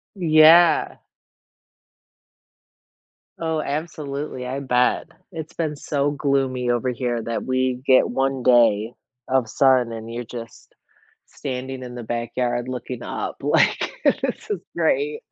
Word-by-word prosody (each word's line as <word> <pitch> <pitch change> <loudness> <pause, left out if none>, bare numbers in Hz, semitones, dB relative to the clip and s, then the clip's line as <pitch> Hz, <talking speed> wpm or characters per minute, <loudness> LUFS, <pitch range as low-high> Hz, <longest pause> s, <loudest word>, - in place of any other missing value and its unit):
Yeah. 165 -1 +5 2.4
Oh, 160 -1 -1
absolutely, 145 -3 -4
I 130 +2 -3
bet, 125 -2 +1 0.2
it's 160 0 -7
been 155 -3 -2
so 145 0 -1
gloomy 135 -3 0
over 120 +1 0
here 120 -1 -2
that 115 +1 -3
we 130 -1 0
get 130 -2 +5
1 135 0 -1
day 120 -3 +4 0.3
of 130 -3 +1
sun 130 -1 +3
and 115 0 -7
you're 120 +1 -4
just 115 -2 -10 0.5
standing 130 0 -6
in 125 -1 -8
the 120 - -6
backyard 120 +1 -2
looking 125 -1 -6
up - - -4
like, - - +2
"This - - 0
is 415 - -1 0.2
great." 445 -1 0
130 Hz, 120 wpm, -22 LUFS, 120-145 Hz, 2.4 s, Yeah